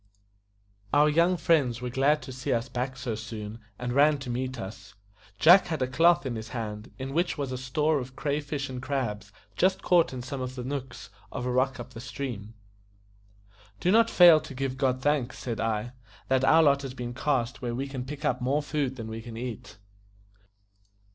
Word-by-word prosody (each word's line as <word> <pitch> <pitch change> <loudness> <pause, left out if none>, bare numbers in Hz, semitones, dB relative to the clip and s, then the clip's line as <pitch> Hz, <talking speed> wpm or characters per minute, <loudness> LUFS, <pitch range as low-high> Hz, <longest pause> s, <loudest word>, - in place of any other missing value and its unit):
Our 150 +1 +5
young 170 +4 +3
friends 140 -9 +2
were 125 0 -4
glad 140 +4 +2
to 130 - -8
see 130 +2 -4
us 120 +1 -1
back 130 +2 -3
so 125 -2 -3
soon, 110 0 -7 0.2
and 125 0 -3
ran 145 +2 +5
to 125 -2 -5
meet 130 +1 -3
us; 100 0 -9 0.4
Jack 180 +4 +7
had 160 -6 -1
a - - 0
cloth 165 +5 +4
in 125 -3 -2
his 110 0 -6
hand, 110 -2 -5
in 135 +1 -5
which 170 +2 0
was 140 -3 -3
a - - -2
store 150 +4 +1
of 130 0 -8
cray 145 0 -1
fish 145 -1 -4
and 130 -2 -6
crabs 110 -7 -3 0.2
just 190 +1 +2
caught 175 -2 +4
in 125 -2 -6
some 135 +1 -5
of 130 0 -5
the 125 - -5
nooks 125 -5 -6 0.2
of 125 -2 -4
a 125 - -1
rock 130 +1 +1
up 120 +1 -8
the 115 - -8
stream. 120 -4 -6 1.2
"Do 180 - +2
not 230 +2 +5
fail 175 -3 +8
to 135 - -10
give 135 0 -2
God 130 -1 0
thanks," 145 -4 0
said 115 -3 -4
I, 110 +1 -1 0.4
"that 130 0 +2
our 160 +4 +6
lot 140 -2 +4
has 135 -2 -6
been 120 -1 -5
cast 130 -1 -1
where 120 -2 -3
we 135 +3 -3
can 135 -2 -5
pick 145 +3 -7
up 125 0 0
more 140 +4 +1
food 145 -3 -2
than 115 -3 -7
we 110 0 -6
can 115 0 -9
eat." 115 -3 -7
130 Hz, 205 wpm, -27 LUFS, 120-145 Hz, 1.2 s, fail